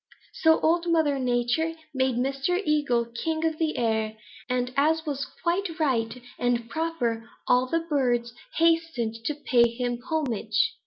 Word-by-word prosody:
So 320 Hz, 0 st, +4 dB
Old 340 Hz, +2 st, +2 dB
Mother 300 Hz, -4 st, +2 dB
Nature 250 Hz, +6 st, +1 dB, 0.2 s
made 260 Hz, -2 st, +1 dB
Mr. 275 Hz, +8 st, 0 dB
Eagle 280 Hz, -6 st, +2 dB
king 315 Hz, +8 st, -2 dB
of 320 Hz, -1 st, -1 dB
the 315 Hz, -2 st, 0 dB
air, 220 Hz, -2 st, 0 dB, 0.3 s
and 250 Hz, 0 st, -1 dB
as 315 Hz, +3 st, +2 dB
was 280 Hz, -2 st, -3 dB, 0.2 s
quite 345 Hz, 0 st, 0 dB
right 245 Hz, -5 st, 0 dB, 0.2 s
and 240 Hz, -1 st, 0 dB
proper, 240 Hz, -7 st, -2 dB, 0.2 s
all 250 Hz, +1 st, +4 dB
the 330 Hz, +5 st, 0 dB
birds 245 Hz, -6 st, +1 dB, 0.2 s
hastened 325 Hz, -10 st, +1 dB
to 300 Hz, -, 0 dB
pay 240 Hz, -5 st, +3 dB
him 245 Hz, 0 st, -3 dB
homage. 260 Hz, -, 0 dB
265 Hz, 145 wpm, -26 LUFS, 240-320 Hz, 0.3 s, So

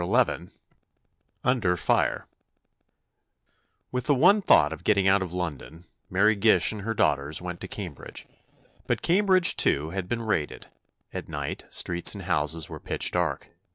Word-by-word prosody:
XI 85 Hz, -, 0 dB, 1.0 s
UNDER 110 Hz, -9 st, +1 dB
FIRE -, -, 0 dB, 1.7 s
With 125 Hz, -1 st, -3 dB
the 145 Hz, -, +3 dB
one 185 Hz, +10 st, +4 dB
thought 75 Hz, -, +4 dB
of 80 Hz, -, -11 dB
getting 100 Hz, -2 st, +2 dB
out 95 Hz, +1 st, +4 dB
of 95 Hz, -3 st, -4 dB
London, 85 Hz, -2 st, -6 dB, 0.3 s
Mary 105 Hz, +4 st, +3 dB
Gish 110 Hz, +2 st, +4 dB
and 105 Hz, -2 st, -7 dB
her 115 Hz, +3 st, -3 dB
daughters 70 Hz, -4 st, 0 dB
went 90 Hz, -1 st, -7 dB
to 95 Hz, -, -6 dB
Cambridge. 90 Hz, -7 st, -8 dB, 0.6 s
But -, -, -1 dB
Cambridge, 185 Hz, 0 st, +4 dB
too, 75 Hz, +3 st, +1 dB
had 95 Hz, -1 st, -4 dB
been 115 Hz, -1 st, -2 dB
raided. 95 Hz, -9 st, -3 dB, 0.5 s
At -, -, -7 dB
night, -, -, -5 dB
streets 85 Hz, +3 st, +2 dB
and 100 Hz, -, -8 dB
houses 80 Hz, -2 st, -1 dB
were -, -, -9 dB
pitch -, -, 0 dB
dark. -, -, -2 dB
95 Hz, 150 wpm, -26 LUFS, 85-115 Hz, 1.7 s, one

